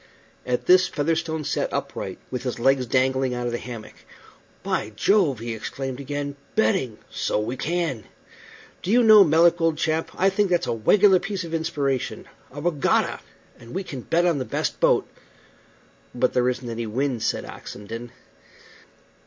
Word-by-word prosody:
At 125 -1 -1
this 185 0 +6
Featherstone 160 0 -1
sat - - -1
upright, - - -4
with 125 - -3
his 125 -2 -3
legs 130 +1 +2
dangling 130 0 +1
out 120 0 -3
of 120 - -1
the 120 - -2
hammock. 115 -3 -8 0.7
"By 105 - -2
Jove!" 180 - +3
he 115 +1 -5
exclaimed 130 +4 -5
again. 145 0 -4 0.2
"Betting! 185 - +1
So - - -1
we 110 +4 -3
can. 155 - -2 0.8
Do - - -5
you 240 +3 +5
know, 215 -2 +9
Melick, 170 +1 +4
old 165 -2 +2
chap, 160 +1 0
I 195 +1 +3
think 200 0 +1
that's 175 -1 +1
a - - -2
wegular 185 - +4
piece 195 0 -3
of 165 -1 -7
inspiration. 150 -5 -2 0.3
A 145 - -8
wegatta! 150 -2 +1 0.4
and 115 +6 -11
we 195 - -2
can 135 -8 -7
bet 170 +7 +1
on 170 -5 +2
the - - -1
best 115 - -3
boat." - - +3 1.1
"But 125 0 +1
there 125 0 +2
isn't 125 0 -4
any 115 0 -4
wind," 125 +1 -1
said 115 - -1
Oxenden. 115 +4 -8
140 Hz, 165 wpm, -24 LUFS, 125-175 Hz, 1.1 s, know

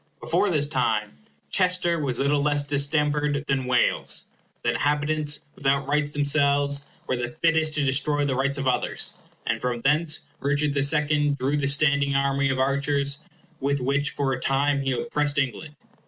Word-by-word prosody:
Before 205 - +1
this 150 -4 +1
time 110 - -1 0.4
Chester 180 -3 +2
was 135 -5 -2
little 140 +1 +1
less 145 0 +1
distempered 145 0 0
than 135 -3 -1
Wales. 125 -1 +1 0.4
The - - +2
inhabitants, 150 0 0
without 140 0 0
rights 145 0 0
themselves, 140 -1 +1 0.2
were 130 - -1
the 120 0 -4
fittest 160 -2 +3
to 145 -2 +1
destroy 145 +2 +1
the 140 - 0
rights 140 +2 -1
of 135 -1 -2
others; 125 - 0 0.3
and 115 -1 -1
from 120 -1 -2
thence 155 +3 +2 0.2
Richard 145 +1 0
the 140 - 0
Second 145 0 +2
drew 135 +3 -1
the 145 -2 0
standing 140 -1 +2
army 140 0 +1
of 135 - -1
archers 140 +1 0 0.4
with 140 +1 0
which 140 +3 0
for 135 -2 -1
a 125 - -3
time 140 +2 +1
he 135 -1 -1
oppressed 145 - -1
England. 140 +3 -2
140 Hz, 165 wpm, -24 LUFS, 135-150 Hz, 0.4 s, fittest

